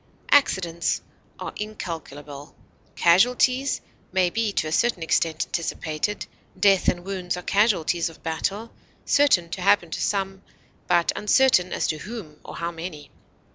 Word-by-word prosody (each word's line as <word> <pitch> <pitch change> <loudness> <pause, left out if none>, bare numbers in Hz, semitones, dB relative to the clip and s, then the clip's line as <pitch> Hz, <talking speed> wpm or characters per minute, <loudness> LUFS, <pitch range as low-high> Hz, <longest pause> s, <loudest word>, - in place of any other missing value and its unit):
Accidents 175 -12 +2 0.4
are - - -5
incalculable; 150 -8 -7 0.4
casualties 250 +9 +3 0.3
may 180 -1 +2
be 225 0 0
to - - 0
a - - -4
certain 205 -1 +1
extent 160 0 +1
anticipated; 165 +3 -3 0.3
death 195 -1 +4
and 175 0 +1
wounds 185 -2 -3
are 180 - -7
casualties 180 -5 +2
of 165 - -16
battle, 200 +8 -2 0.3
certain 275 -12 +4
to 185 - -5
happen 190 -3 +3
to - - -3
some, 195 -1 -1 0.5
but 175 -1 +3
uncertain 210 -5 +3
as - - -1
to 155 - -1
whom 185 -7 -8
or - - -9
how 170 0 -3
many. 165 -3 -8
180 Hz, 135 wpm, -24 LUFS, 165-210 Hz, 0.5 s, death